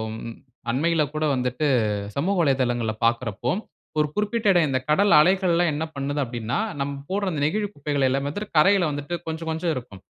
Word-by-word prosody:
ம் 115 0 -7 0.4
அண்மையில 160 +4 +2
கூட 155 0 -1
வந்துட்டு 125 +4 -1 0.5
சமூக 190 +8 0
வலைதளங்கல 120 -5 +1
பாக்குறப்போ, 115 0 0 0.5
1 150 - +3
குறிப்பிட்ட 210 +1 0
இடம், 170 -4 +4
இந்த 130 -1 +1
கடல் 195 +4 +4
அலைகள்லாம் 175 -1 +3
என்ன 155 +2 -2
பண்ணுது 140 +1 -2
அப்பிடினா, 120 -2 -3 0.2
நம்ம 140 0 -3
போடுற 200 0 0
அந்த 145 -3 -3
நெகிழி 205 +6 0
குப்பைகள 145 -2 0
எல்லாமே 135 +2 -1
வந்துட்டு 205 +2 -7
கரையில 180 0 +5
வந்துட்டு 145 +4 -4
கொஞ்ச, 160 0 -3
கொஞ்சம் 165 +1 -1
இருக்கும். 105 -7 -8
150 Hz, 165 wpm, -24 LUFS, 130-175 Hz, 0.5 s, கரையில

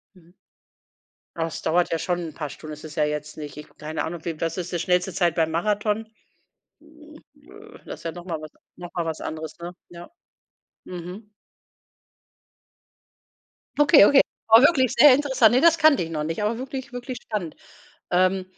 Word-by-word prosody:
Mhm. 175 -1 -22 1.0
Oh, - - -3
das 165 - -5
dauert 175 +2 +1
ja 165 - 0
schon 180 -2 -1
'n - - -13
paar 150 -2 -5
Stunden, 155 +2 -10
ist 150 +1 -11
es 155 0 -10
ja 155 - +1
jetzt 150 0 -3
nicht 150 -1 -8
ich 150 - -9
keine 155 +1 -4
Ahnung, 165 0 -6
wie 165 -2 -5
was 165 0 -2
ist 180 0 -5
die 175 - -2
schnellste 180 +2 +1
Zeit 170 -3 +1
beim 160 -1 +1
Marathon? 210 +5 -1 1.8
Das - - -8
ist - - -17
ja 165 - -3
noch 175 0 -10
mal 165 -4 -4
was 155 - -9 0.3
noch 175 -1 -10
mal 170 - -1
was 160 -1 -4
anderes, 155 -1 -6
ne? 175 +1 -6 0.2
Ja. 175 0 -11 0.8
Mhm. 180 +4 -9 2.5
Okay, 290 -6 +7
okay. 275 +3 +6 0.3
War 225 +1 +8
wirklich 270 -4 +4
sehr 275 +3 +9
interessant. 265 -5 +3
Ne, 255 - +4
das 335 +2 +5
kannte 310 - +4
ich 165 - -7
noch 155 -2 -3
nicht, 165 +5 -3
aber 215 +2 -1
wirklich, 260 0 -7
wirklich 245 +1 -6
spannend. 195 -8 -5 0.6
Ähm. 185 +1 +2
175 Hz, 180 wpm, -24 LUFS, 160-225 Hz, 2.5 s, sehr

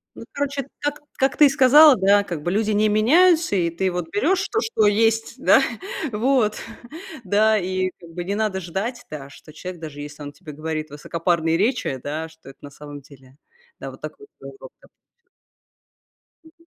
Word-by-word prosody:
Ну, - - -10
короче, 280 -1 -3
как 290 0 -3 0.2
как 270 +1 +1
ты 300 - +7
и - - +5
сказала, 275 +3 +7
да, 200 0 +3
как 170 -6 -6
бы 175 - -1
люди 215 +2 0
не 210 +1 +2
меняются, 315 - +4
и 175 -3 +1
ты 185 +3 -1
вот 175 -2 -4
берешь 330 - +1
то, 440 - 0
что 335 - +1
есть, 225 +2 +1
да, - - +4 0.5
вот, 225 -1 +1 0.7
да, 215 +2 +3
и, 185 -1 -2
как 170 - -14
бы, 175 +1 -5
не 200 +2 -2
надо 210 -3 -1
ждать, 195 +8 -5
да, 140 -2 -8
что 155 +2 -15
человек, 180 +2 -8
даже 150 -2 -8
если 145 +1 -10
он 145 0 -8
тебе 150 +1 -11
говорит 155 +1 -5
высокопарные 165 +2 -1
речи, 215 - 0
да, 155 +3 -4
что 160 -4 -16
это 135 - -15
на 145 - -11
самом 145 0 -11
деле 135 -1 -19 0.4
Да, - - -6
вот - - -15
так - - -6
вот 420 - -14
назло - - -11
прям. - - -21 1.6
Мгм. 335 +1 -22
195 Hz, 185 wpm, -22 LUFS, 160-245 Hz, 1.6 s, ты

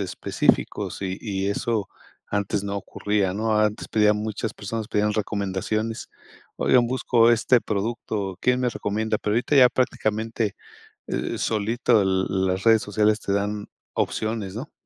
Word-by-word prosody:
específicos 95 -2 0
y 95 -1 -2
y 100 -3 -2
eso 105 0 -1 0.4
antes 100 0 -1
no 100 0 -3
ocurría, 100 -1 -1
¿no? 110 +1 +1
Antes 105 0 0
pedían 105 -1 +3
muchas 110 +1 -3
personas 110 +2 -5
pedían 105 0 +1
recomendaciones: 110 +2 -2 0.5
"Oigan, 120 -2 +4
busco 120 -2 +3
este 120 +1 +4
producto, 105 -2 -3
¿quién 125 0 +2
me 125 - +2
recomienda?". 110 0 -1
Pero 105 - -2
ahorita 125 +5 +1
ya 130 -2 +8
prácticamente, 110 -3 -1 0.5
eh, - - -2
solito 115 +2 +2
l 95 - +1 0.2
las 95 0 0
redes 115 -1 +6
sociales 105 +1 +1
te 100 - -2
dan 105 +1 -2 0.3
opciones, 110 -3 -2
¿no? 135 +7 -6
105 Hz, 140 wpm, -24 LUFS, 100-115 Hz, 0.5 s, ya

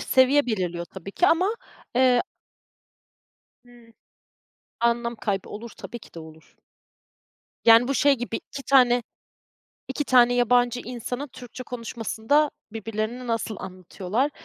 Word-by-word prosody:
Seviye 265 +2 +4
belirliyor 180 -6 -2
tabii 190 +2 -10
ki 355 - +2
ama, 370 +5 +3 0.4
eee 255 -1 +4 1.4
Hıı. 240 -1 -19 0.9
Anlam 235 0 +1
kaybı 195 -3 -3
olur, 225 +1 -8
tabii 240 - -8
ki - - -17
de 165 - -8
olur. 160 0 -14 1.1
Yani 230 +2 +7
bu 275 - 0
şey 285 +1 +4
gibi 245 -2 -4
2 275 - -9
tane, 245 -3 +4 0.9
2 270 +2 -3
tane 245 -1 +5
yabancı 245 0 +3
insanın 245 +3 -5
Türkçe 255 -1 -10
konuşmasında 235 +4 -1 0.2
birbirlerini 225 +3 -4
nasıl 225 -2 -2
anlatıyorlar? 185 - -3
240 Hz, 120 wpm, -25 LUFS, 220-255 Hz, 1.4 s, Yani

